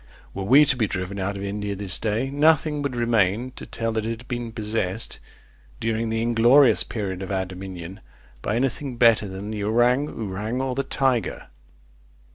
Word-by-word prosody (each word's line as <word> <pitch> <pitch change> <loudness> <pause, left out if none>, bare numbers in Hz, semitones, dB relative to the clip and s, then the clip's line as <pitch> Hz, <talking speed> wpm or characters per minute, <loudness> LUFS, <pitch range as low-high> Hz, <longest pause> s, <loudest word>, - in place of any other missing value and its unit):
Were 100 - -4
we 140 +8 +7
to 140 - +3
be 115 -4 +1
driven 95 +1 -4
out 100 +1 -2
of 100 - -6
India 100 0 -3
this 100 -2 -1
day, 115 +5 -1
nothing 150 0 +3
would 140 -3 -2
remain, 115 0 +1
to - - -10
tell 115 0 -2
that 110 -1 -1
It 115 0 -2
had 120 - -15
been 120 -2 -4
possessed, 110 -2 -2 0.6
during 115 0 -1
the 110 0 -1
inglorious 120 +4 +5
period 100 -5 -4
of 95 - -5
our 95 -1 0
dominion, 95 0 -8 0.4
by 105 - -1
any 130 +3 +2
thing 130 +1 -7
better 115 -3 +4
than 95 +2 -6
the 105 -2 -3
ourang 120 +6 +2
ourang 110 +1 -4
or 130 -1 -1
the 135 - 0
tiger. 130 -3 -1
115 Hz, 185 wpm, -24 LUFS, 100-125 Hz, 0.6 s, we